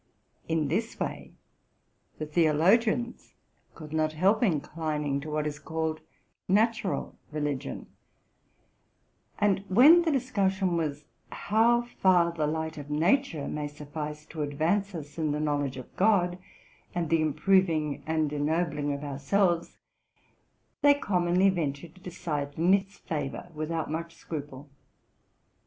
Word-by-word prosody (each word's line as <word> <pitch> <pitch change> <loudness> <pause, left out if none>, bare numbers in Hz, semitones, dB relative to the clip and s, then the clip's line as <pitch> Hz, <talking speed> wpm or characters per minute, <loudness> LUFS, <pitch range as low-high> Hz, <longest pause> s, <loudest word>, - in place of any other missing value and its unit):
In 160 -2 0
this 220 +10 -2
way - - -4 0.9
the 155 - -4
theologians 180 +10 +2 0.4
could 155 -1 -10
not 155 0 +1
help 190 +7 +3
inclining 150 - -1
e - - -7
what 150 0 -1
is 150 0 -4
called 160 0 -3 0.5
natural 215 0 +1 0.2
religi 145 -3 -2
ion; - - -6 1.5
and, 200 -2 +2
when 280 - +7
the 335 - 0
discussion 200 -9 +1
w 155 -4 0 0.3
how 235 +3 +2
far 185 -7 +3
the 155 -3 -1
light 160 0 -3
of 145 0 -9
nature 165 - +1
may 150 -1 -3
suffice 150 +1 -7
to 160 - -7
advance 165 +7 0
us 150 0 -8
in 155 -2 0
the 150 - -2
knowledge 145 -3 -1
of 130 - -10
God 185 -3 +2 0.6
and 170 -2 -1
the 165 -1 +4
improving 155 -1 +2
and 155 -2 0
ennobling 150 0 0
of 140 +1 -5
our 140 -2 -5
selves, 175 +3 +1 1.0
they 285 0 +6
commonly 185 -5 +2
ventured 155 -2 -3
to 185 - -19
decide 150 -6 -4
in 175 +4 +4
its 200 0 0
favor 150 +2 -4
without 155 0 -3
much 165 +1 -4
scruple. 145 -3 -7
160 Hz, 130 wpm, -28 LUFS, 150-190 Hz, 1.5 s, when